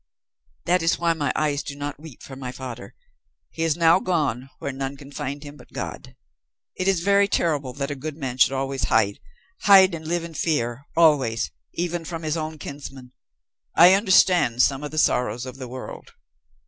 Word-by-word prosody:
"That 180 +1 +2
is 165 +1 +2
why 170 -1 +1
my 145 -4 -1
eyes 150 -2 0
do 140 - -7
not 145 0 -5
weep 155 -5 -12
for 135 - -9
my 130 -1 -6
father. 125 -2 -8 0.6
He 165 - -7
is 165 -1 +1
now 165 +1 +5
gone 145 -9 -1
where 140 - -4
none 135 +1 -5
can 140 0 -13
find 140 +1 -5
him 145 0 -10
but - - -17
God. - - -7 0.6
It 185 - -2
is 190 -3 +2
very 200 +2 +4
terrible 150 -9 0
that 140 +1 -4
a - - -3
good 150 +2 -6
man 130 -4 -5
should - - +6
always 135 0 -2
hide 100 -3 +2 0.4
hide 195 -3 +7
and 160 -1 -6
live 170 0 -1
in 170 -1 -8
fear 140 -5 -1
always 140 -9 +3 0.2
even 175 0 -2
from 165 0 -6
his 155 0 -1
own 155 -1 -4
kinsmen. 135 -3 -9 0.6
I 175 +3 +8
understand 185 - +4
some 135 0 +1
of 150 - -4
the 155 - -8
sorrows 125 -4 +1
of 130 0 -8
the 130 -2 -7
world." 130 +1 -9
145 Hz, 190 wpm, -23 LUFS, 135-165 Hz, 0.6 s, I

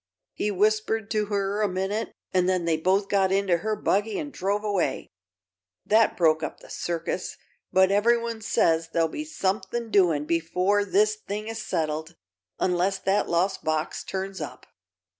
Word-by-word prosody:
He 210 - -1
whispered 215 +2 +1
to 215 -2 0
her 200 0 -1
a 210 - +3
minute 195 +4 -2 0.2
an' 185 -1 +3
then 185 -2 +1
they 165 -1 +2
both 190 +5 +1
got 195 -2 +2
into 195 -2 +2
her 215 +5 -2
buggy 210 +1 0
an' 290 -2 -5
drove 200 0 -1
away. 195 -10 -1 0.7
That 220 +1 +3
broke 160 -2 +3
up - - -5
the - - -14
circus, 170 +1 -3 0.3
but 190 0 +4
ev'ryone 230 +2 +2
says 165 -5 +2
there'll 165 -1 +3
be 305 - -5
something 220 -4 -2
doing 170 -8 +3
before 180 +5 +1
this 420 - +3
thing 215 - -5
is 225 -1 -4
settled, 160 -3 -2 0.4
unless 185 +2 +1
that 195 +2 0
lost 180 +3 0
box 155 0 -1
turns 190 -1 -4
up." 150 - -7
195 Hz, 160 wpm, -26 LUFS, 175-215 Hz, 0.7 s, but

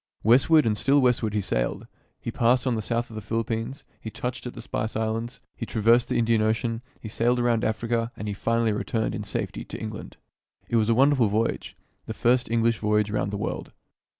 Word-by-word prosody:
Westward 135 +8 +5
and 110 -2 +2
still 135 +7 +3
westward 125 -4 +2
he 105 - +1
sailed. - - -2 0.3
He - - -5
passed 125 +2 +2
on 130 - +1
the 110 - -1
south 120 +2 -2
of - - -9
the 110 - -5
Philippines, 115 +4 -3 0.2
he 110 - -6
touched 125 +3 -5
at 125 - -8
the - - -7
Spice 110 +1 -3
Islands, 110 +2 -2
he 115 - -6
traversed 115 +2 +3
the - - 0
Indian 115 -1 +2
Ocean, 115 +1 0 0.2
he - - -8
sailed 120 +3 +1
around 120 -2 +1
Africa, 115 +1 -1
and 105 0 -4
finally 115 +2 +1
returned 110 +1 -1
in - - -4
safety - - -4
to - - -7
England. 110 -1 -7 0.5
It 120 - +2
was 110 0 +2
a 115 - +4
wonderful 135 -2 +4
voyage 110 +3 -1
— - - -44
the - - -5
first 125 0 +2
English 115 -1 +2
voyage 105 -1 +1
round 100 -2 -1
the 100 - -3
world. 105 - -4
115 Hz, 205 wpm, -25 LUFS, 110-120 Hz, 0.5 s, Westward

